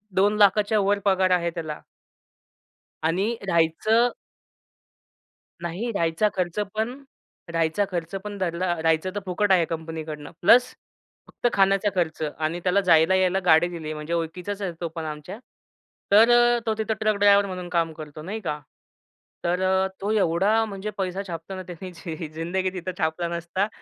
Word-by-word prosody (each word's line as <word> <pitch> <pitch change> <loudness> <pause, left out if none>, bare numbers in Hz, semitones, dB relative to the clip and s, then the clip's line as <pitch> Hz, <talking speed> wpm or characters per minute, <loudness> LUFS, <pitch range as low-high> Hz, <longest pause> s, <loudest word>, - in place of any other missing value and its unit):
₹2,00,000 205 +1 +4
च्या 215 - +3
वर 205 0 +2
पगार 190 -1 +3
आहे 170 -1 +2
त्याला. 155 -3 -5 1.2
आणि 195 +8 +1
राहायचं 190 +8 +3 1.5
नाही, 180 +8 -3
राहायचा 170 0 +1
खर्च 180 +1 -2 0.2
पण 245 +6 -3 0.5
राहायचा 165 +4 +1
खर्च 170 +1 -4
पण 205 -1 -6
धरला. 175 -1 -1
राहायचं 160 +2 +2
तर 205 - 0
फुकट 195 +2 0
आहे 180 -3 +5
कंपनीकडनं, 160 -2 -6
प्लस 245 +7 +5 0.5
फक्त - - -2
खाण्याचा 195 +1 +3
खर्च 165 -3 -1 0.2
आणि 160 +2 -2
त्याला 185 +2 +3
जायला-यायला 185 +2 +4
गाडी 165 0 +5
दिली. 160 -3 -5
म्हणजे 150 +2 -5
ओळखीचाच 180 +5 -3
आहे 190 -3 -2
तो 170 - -1
पण 165 -1 -4
आमच्या, 150 +7 -7 0.7
तर 220 +4 +7 0.3
अ, - - -2
तो 220 - +1
तिथं 220 0 -1
ट्रक-ड्रायव्हर 205 -2 +4
म्हणून 180 -2 -6
काम 165 -2 0
करतो, 155 -1 -9
नाही 200 +7 -5
का 150 -4 -3 0.8
तर 175 +2 0 0.4
तो 200 - -2
एवढा 205 +2 +2
म्हणजे 200 -1 -5
पैसा 190 0 -2
छापताना, 175 +3 -6
त्याने 180 +1 -8
जे 165 -1 -7
जिंदगी 180 +4 -1
तिथं 185 0 -4
छापला 160 +2 -1
नसता 170 +4 -2
180 Hz, 145 wpm, -24 LUFS, 165-200 Hz, 1.5 s, तर